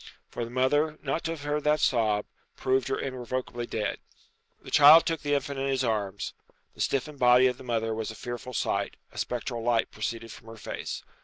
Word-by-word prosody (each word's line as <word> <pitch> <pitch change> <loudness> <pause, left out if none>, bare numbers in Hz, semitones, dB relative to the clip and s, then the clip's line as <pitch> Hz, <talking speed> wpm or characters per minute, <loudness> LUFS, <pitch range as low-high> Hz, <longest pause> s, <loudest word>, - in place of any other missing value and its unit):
For 120 - -3
the 115 - -5
mother 145 +5 +1
not 145 +3 -1
to 165 - -1
have 150 -3 -9
heard 145 0 -1
that 150 +1 +3
sob, 110 -5 +2 0.3
proved 130 -1 +1
her - - -1
irrevocably 125 -1 -4
dead. 105 -2 -2 0.6
The - - -10
child 150 +3 +9
took 165 -2 -1
the 145 0 +1
infant 140 -1 -2
in 135 - -1
his 135 -1 +1
arms. 105 -4 -2 0.4
The - - -8
stiffened 140 +1 -1
body 125 +1 +6
of 125 -1 +1
the - - -10
mother 115 -2 -1
was 110 0 -3
a 110 - -7
fearful 120 +2 -6
sight; - - -1 0.2
a - - -8
spectral 120 -1 -3
light 115 0 +1
proceeded 115 +1 -4
from 115 - -13
her 115 0 -10
face. - - -5
125 Hz, 205 wpm, -28 LUFS, 115-140 Hz, 0.6 s, child